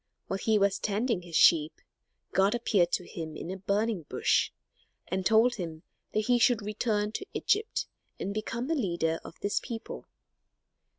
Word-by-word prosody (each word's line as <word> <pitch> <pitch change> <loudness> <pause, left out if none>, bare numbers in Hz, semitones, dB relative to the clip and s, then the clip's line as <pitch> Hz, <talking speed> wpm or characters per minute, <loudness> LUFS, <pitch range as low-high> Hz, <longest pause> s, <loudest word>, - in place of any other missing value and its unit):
While 195 - -3
he 220 +1 +2
was 200 -1 +2
tending 215 0 0
his 170 -2 -8
sheep 155 -1 +5 0.5
God 195 +3 +3
appeared 200 -7 +2
to 180 - 0
him 160 -3 -6
in 175 - -5
a 190 - -4
burning 200 +1 0
bush - - +2 0.6
and 185 +1 -2
told 225 +5 +5
him 165 -4 -6 0.3
that 215 - +2
he 245 +1 +3
should 235 -2 +3
return 210 0 -1
to 390 - -5
Egypt 430 +3 0 0.3
and 200 - -3
become 230 +3 -3
the 320 - 0
leader 170 - 0
of - - -11
his 200 +1 +1
people. 230 -2 -7
205 Hz, 165 wpm, -29 LUFS, 180-225 Hz, 0.6 s, sheep